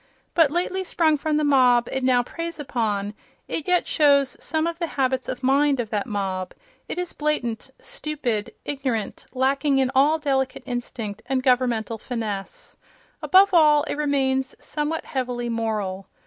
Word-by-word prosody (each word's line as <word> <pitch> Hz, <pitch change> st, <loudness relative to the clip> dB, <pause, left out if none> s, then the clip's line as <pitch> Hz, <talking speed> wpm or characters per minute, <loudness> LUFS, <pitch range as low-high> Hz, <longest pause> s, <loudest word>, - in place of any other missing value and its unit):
But 325 Hz, -4 st, +5 dB
lately 360 Hz, +4 st, -1 dB
sprung 325 Hz, -3 st, +2 dB
from 305 Hz, +1 st, 0 dB
the 305 Hz, -, +1 dB
mob 250 Hz, -4 st, +4 dB
it 265 Hz, -, -2 dB
now 250 Hz, -1 st, +3 dB
preys 335 Hz, +5 st, -6 dB
upon, 210 Hz, -7 st, -2 dB, 0.3 s
it 310 Hz, -, -3 dB
yet 360 Hz, -1 st, +3 dB
shows 280 Hz, -4 st, +3 dB
some 315 Hz, +2 st, -1 dB
of 335 Hz, 0 st, -3 dB
the 340 Hz, -, -1 dB
habits 260 Hz, -1 st, 0 dB
of 255 Hz, 0 st, -5 dB
mind 275 Hz, +1 st, +3 dB
of 225 Hz, -3 st, -3 dB
that 210 Hz, 0 st, -1 dB
mob: 190 Hz, -4 st, -3 dB, 0.3 s
it -, -, -4 dB
is 360 Hz, -1 st, -3 dB
blatant, 275 Hz, -7 st, -2 dB
stupid, 290 Hz, -, -3 dB
ignorant, 260 Hz, -6 st, -3 dB
lacking 270 Hz, +2 st, +1 dB
in 265 Hz, -1 st, +2 dB
all 285 Hz, +4 st, +4 dB
delicate 270 Hz, -3 st, -1 dB
instinct 240 Hz, -4 st, -5 dB
and 260 Hz, -1 st, 0 dB
governmental 245 Hz, -3 st, +1 dB
finesse. 225 Hz, -, -5 dB, 0.4 s
Above 385 Hz, +1 st, +5 dB
all, 300 Hz, -3 st, +6 dB
it -, -, -3 dB
remains 270 Hz, -3 st, 0 dB
somewhat 300 Hz, +2 st, -3 dB
heavily 245 Hz, -2 st, -3 dB
moral. 210 Hz, -4 st, -2 dB
265 Hz, 155 wpm, -24 LUFS, 240-300 Hz, 0.4 s, all